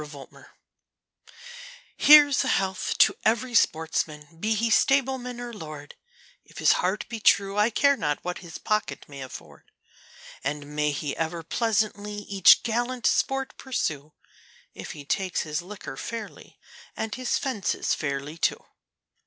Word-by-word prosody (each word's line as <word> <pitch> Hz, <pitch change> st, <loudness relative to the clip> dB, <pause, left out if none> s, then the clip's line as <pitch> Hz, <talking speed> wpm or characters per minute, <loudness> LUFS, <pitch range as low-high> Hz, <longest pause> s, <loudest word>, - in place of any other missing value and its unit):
A 150 Hz, -, -7 dB
Hunting 145 Hz, -2 st, -12 dB
Song -, -, -16 dB, 1.5 s
Here's 290 Hz, -2 st, +7 dB
a -, -, -3 dB
health 190 Hz, -5 st, 0 dB
to -, -, +5 dB
every 235 Hz, +3 st, +1 dB
sportsman, 160 Hz, -5 st, 0 dB
be 220 Hz, +4 st, 0 dB
he 225 Hz, +2 st, 0 dB
stableman 260 Hz, -1 st, +1 dB
or 240 Hz, -1 st, -6 dB
lord, 155 Hz, -6 st, -9 dB, 0.5 s
If -, -, -18 dB
his -, -, +4 dB
heart -, -, -1 dB
be 230 Hz, -, -6 dB
true, 200 Hz, -1 st, +3 dB
I 210 Hz, +2 st, +4 dB
care 280 Hz, +5 st, +3 dB
not 150 Hz, -, -1 dB
what 180 Hz, 0 st, -4 dB
his 170 Hz, -3 st, -9 dB
pocket 215 Hz, 0 st, -2 dB
may 140 Hz, -2 st, -10 dB
afford; 130 Hz, -, -11 dB, 0.8 s
And 145 Hz, +1 st, -4 dB
may 150 Hz, 0 st, +1 dB
he 145 Hz, 0 st, -3 dB
ever 165 Hz, +1 st, -3 dB
pleasantly 210 Hz, +1 st, -1 dB
each 195 Hz, -2 st, +5 dB
gallant 240 Hz, +2 st, -2 dB
sport 270 Hz, 0 st, +1 dB
pursue, 155 Hz, -, -3 dB, 0.6 s
If -, -, -8 dB
he 145 Hz, -2 st, -10 dB
takes 185 Hz, +5 st, -1 dB
his 150 Hz, 0 st, -3 dB
liquor 185 Hz, -6 st, -9 dB
fairly, 225 Hz, +4 st, -8 dB, 0.4 s
and 220 Hz, -1 st, -3 dB
his 255 Hz, -1 st, -1 dB
fences 255 Hz, -8 st, -1 dB
fairly, 140 Hz, +2 st, -4 dB
too. -, -, 0 dB
200 Hz, 145 wpm, -26 LUFS, 150-240 Hz, 1.5 s, Here's